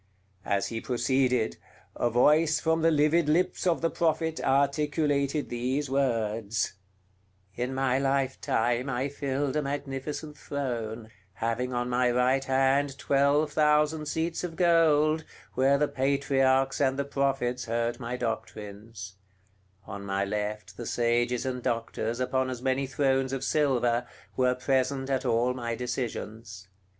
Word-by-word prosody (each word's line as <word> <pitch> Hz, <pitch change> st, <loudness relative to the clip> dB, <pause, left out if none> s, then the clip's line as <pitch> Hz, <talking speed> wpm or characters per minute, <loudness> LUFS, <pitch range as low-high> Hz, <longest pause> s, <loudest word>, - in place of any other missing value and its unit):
As 100 Hz, 0 st, 0 dB
he 115 Hz, -1 st, -4 dB
proceeded, 125 Hz, -1 st, +1 dB, 0.4 s
a 120 Hz, -, +1 dB
voice 150 Hz, +6 st, +4 dB
from 160 Hz, 0 st, +1 dB
the 165 Hz, -, +4 dB
livid 155 Hz, +1 st, +3 dB
lips 180 Hz, +3 st, +1 dB
of 170 Hz, -, +2 dB
the 165 Hz, -, +1 dB
Prophet 160 Hz, -1 st, 0 dB
articulated 140 Hz, +1 st, +1 dB
these 130 Hz, +4 st, -2 dB
words: 115 Hz, -5 st, 0 dB, 0.8 s
"In 125 Hz, +2 st, -3 dB
my 130 Hz, -1 st, +1 dB
lifetime 130 Hz, -2 st, 0 dB
I 130 Hz, +2 st, -1 dB
filled 140 Hz, 0 st, -2 dB
a 150 Hz, -, +2 dB
magnificent 145 Hz, +1 st, -4 dB
throne, 115 Hz, -5 st, -4 dB, 0.2 s
having 115 Hz, +5 st, -2 dB
on 120 Hz, 0 st, -1 dB
my 125 Hz, 0 st, +2 dB
right 125 Hz, +2 st, +2 dB
hand 135 Hz, +1 st, +1 dB
twelve 140 Hz, +3 st, +2 dB
thousand 150 Hz, 0 st, +2 dB
seats 165 Hz, +3 st, -2 dB
of 170 Hz, -2 st, -4 dB
gold, 160 Hz, -3 st, +3 dB, 0.3 s
where 135 Hz, +2 st, +3 dB
the 150 Hz, +1 st, +2 dB
patriarchs 135 Hz, 0 st, +1 dB
and 135 Hz, -1 st, +2 dB
the 140 Hz, -, -1 dB
prophets 135 Hz, -3 st, -1 dB
heard 115 Hz, +1 st, -1 dB
my 125 Hz, 0 st, -4 dB
doctrines; 105 Hz, -3 st, -6 dB, 0.7 s
on 100 Hz, -1 st, -7 dB
my 100 Hz, 0 st, -1 dB
left 105 Hz, +1 st, -4 dB
the 120 Hz, -, -6 dB
sages 120 Hz, +1 st, +1 dB
and 125 Hz, -1 st, -3 dB
doctors, 115 Hz, -1 st, -2 dB
upon 130 Hz, +1 st, 0 dB
as 125 Hz, -2 st, -4 dB
many 130 Hz, +2 st, 0 dB
thrones 135 Hz, 0 st, +1 dB
of 135 Hz, -1 st, -3 dB
silver, 125 Hz, -5 st, +1 dB, 0.3 s
were 125 Hz, 0 st, +2 dB
present 135 Hz, +1 st, 0 dB
at 135 Hz, 0 st, 0 dB
all 120 Hz, +1 st, +2 dB
my 120 Hz, -2 st, -3 dB
decisions. 115 Hz, -5 st, -5 dB
130 Hz, 135 wpm, -28 LUFS, 120-140 Hz, 0.8 s, voice